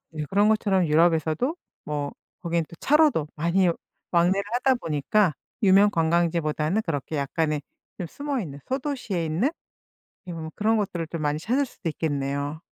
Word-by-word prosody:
예. 150 -1 -3
그런 205 +2 +4
것처럼 195 -4 +2
유럽에서도 165 - +2 0.3
뭐 145 -1 -2 0.3
거기는 170 -1 0
또 - - -11
차로도 295 - +3
많이 170 +4 +2 0.4
왕래를 180 +3 +3
하다 260 +1 +3
보니까 165 - +1 0.3
유명 200 +1 +6
관광지보다는 165 +1 +1
그렇게 150 -1 -3
약간의 150 +1 -1 0.4
좀 180 - -4
숨어있는 240 - -4
소도시에 255 - -2
있는 170 - +1 0.8
예 180 - -5
뭐 160 -1 -6
그런 220 +2 +2
것들을 180 -6 -2
좀 165 -1 -4
많이 150 0 0
찾을 250 - +1
수도 220 -8 -6
있겠네요. 145 -1 -2
170 Hz, 340 characters per minute, -25 LUFS, 155-210 Hz, 0.8 s, 유명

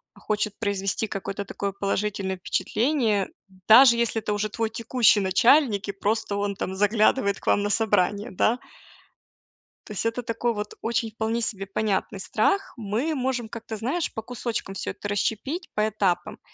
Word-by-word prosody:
хочет 210 -1 -2
произвести 200 0 -1
какое-то 195 0 -4
такое 200 +1 -3
положительное 200 -1 -2
впечатление, 215 - 0 0.4
даже 235 +2 +9
если 235 -1 0
это 210 - -2
уже 210 +1 -1
твой 225 +1 -2
текущий 230 -1 +3
начальник 215 +2 +3
и - - -1
просто 205 +1 -1
он 200 0 -1
там 190 - -4
заглядывает 205 +1 +2
к - - -17
вам 205 - +4
на 205 - -1
собрание, 205 0 +1
да. 215 +5 +2 1.3
То 210 - -7
есть 205 - -3
это 230 +2 -1
такой 230 +1 -1
вот 210 -1 -5
очень 230 -1 -1
вполне 225 +2 -1
себе 200 -4 -2
понятный 200 -1 -1
страх. 310 - 0
Мы 230 +9 -1
можем 255 -4 -2
как-то, 225 -1 -7
знаешь, 275 +10 -2
по 220 - -4
кусочкам 225 -4 -4
всё - - -3
это - - -7
расщепить, 225 - -2
по 215 0 +1
этапам 195 -4 -1
215 Hz, 160 wpm, -25 LUFS, 200-235 Hz, 1.3 s, даже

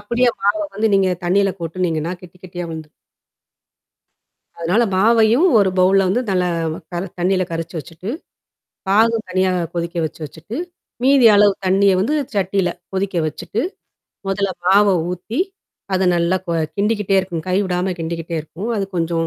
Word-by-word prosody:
அப்படியே 235 +4 +2
மாவ 205 +1 +2 0.2
வந்து 220 +2 +1
நீங்க 195 -1 +3 0.2
தண்ணீல 195 +2 +2
கொட்டுனீங்கன்னா 165 -1 -2
கெட்டி 180 0 -14
கெட்டியா 175 -1 -6
வந்துரும். 160 -1 -8 1.7
அதனால 180 +8 +2
மாவையும், 225 - +4
ஒரு 195 - +3
பவுல்ல 190 +1 +4
வந்து 240 +6 +1
நல்ல 180 -1 +2 0.5
க - - -13 0.3
தண்ணீல 185 +1 +2
கரைச்சு 165 +1 -4
வச்சுட்டு. 165 +8 -8 0.8
பாகு 225 +3 +4
தனியா 185 0 +1 0.2
கொதிக்க 170 0 -3
வச்சு 155 - -7
வச்சுட்டு, 165 - -8 0.5
மீதியளவு 220 -7 +6
தண்ணிய 195 +1 +4
வந்து 230 +10 0 0.2
சட்டில 190 -1 +1 0.2
கொதிக்க 190 -1 -2
வச்சுட்டு. 200 +8 -3 0.7
மொதல்ல 195 0 0 0.2
மாவ 200 +3 +5 0.2
ஊத்தி. 200 - -3 0.5
அது 190 0 +2
நல்லா 170 +2 +2
கோ 170 - -2 0.2
கிண்டிக்கிட்டே 205 -1 +1
இருக்கும். 170 -4 -5
கை 185 - +1
விடாம 180 0 -1
கிண்டிக்கிட்டே 165 0 -4
இருக்கும். 180 +8 -7
அது 195 - 0
கொஞ்சம். 165 0 0
190 Hz, 135 wpm, -19 LUFS, 170-205 Hz, 1.7 s, மீதியளவு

